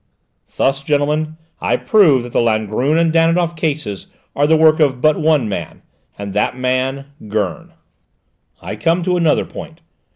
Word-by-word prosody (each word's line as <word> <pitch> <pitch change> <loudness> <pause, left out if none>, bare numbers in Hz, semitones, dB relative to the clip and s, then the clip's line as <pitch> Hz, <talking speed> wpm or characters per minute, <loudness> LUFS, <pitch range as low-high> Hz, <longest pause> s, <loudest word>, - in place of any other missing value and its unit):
"Thus, 135 0 +1
gentlemen, 150 +1 -1 0.2
I - - +1
prove 160 - +3
that 120 - -10
the - - +2
Langrune 115 +6 0
and 165 -1 +2
Danidoff 165 +1 +2
cases 150 - -3 0.3
are 145 +1 +2
the 160 +1 +4
work 155 0 +4
of 135 -5 +2
but 155 +2 +2
one 155 -6 +2
man, 105 - -6 0.3
and 100 -1 -6
that 105 +4 0
man, 130 +2 -1 0.2
Gurn. 100 -6 -3 0.9
"I - - -6
come 170 +2 +1
to 180 +1 0
another 165 -4 +2
point. - - -10
145 Hz, 155 wpm, -17 LUFS, 125-160 Hz, 0.9 s, the